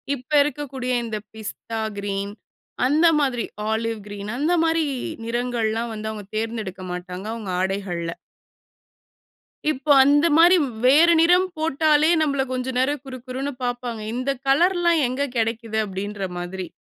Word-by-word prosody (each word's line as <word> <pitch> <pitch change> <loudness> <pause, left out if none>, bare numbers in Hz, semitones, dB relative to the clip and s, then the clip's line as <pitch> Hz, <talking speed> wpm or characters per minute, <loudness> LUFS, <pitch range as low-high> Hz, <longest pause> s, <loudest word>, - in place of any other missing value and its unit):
இப்போ 260 +3 -4
இருக்கக்கூடிய 275 -4 -4
இந்த 225 -2 -3 0.2
பிஸ்தா 220 +1 -6 0.2
கிரீன் 200 0 -3 0.5
அந்த 305 +6 +4
மாதிரி 255 -6 0 0.3
ஆலிவ் 225 0 -1
கிரீன் 205 0 -7
அந்த 310 +5 +1
மாதிரி 325 0 +2 0.4
நிறங்கள்லாம் 235 -1 -1
வந்து 215 0 -5
அவங்க 210 -2 -8
தேர்ந்தெடுக்க 220 -4 -4
மாட்டாங்க, 180 +2 -6
அவங்க 215 -5 -5
ஆடைகள்ல. 185 -3 -2 1.6
இப்போ 280 +1 -5
அந்த 290 +3 +4
மாரி 345 +3 +7 0.3
வேறு 310 +7 +6
நிறம் 355 +3 +5
போட்டாலே 310 0 +3
நம்மள 280 -3 +1
கொஞ்சம் 255 0 -3
நேரம் 280 +1 0
குரு 255 -1 -7
குருன்னு 265 +3 -3
பார்ப்பாங்க. 245 -2 -3
"இந்த 255 +3 -1 0.2
கலர்லாம் 340 +2 +3
எங்க 275 +3 -1
கெடைக்குது?" 225 -1 -1
அப்படின்ற 195 +1 -4
மாதிரி. 180 +1 -5
245 Hz, 130 wpm, -23 LUFS, 215-290 Hz, 1.6 s, மாரி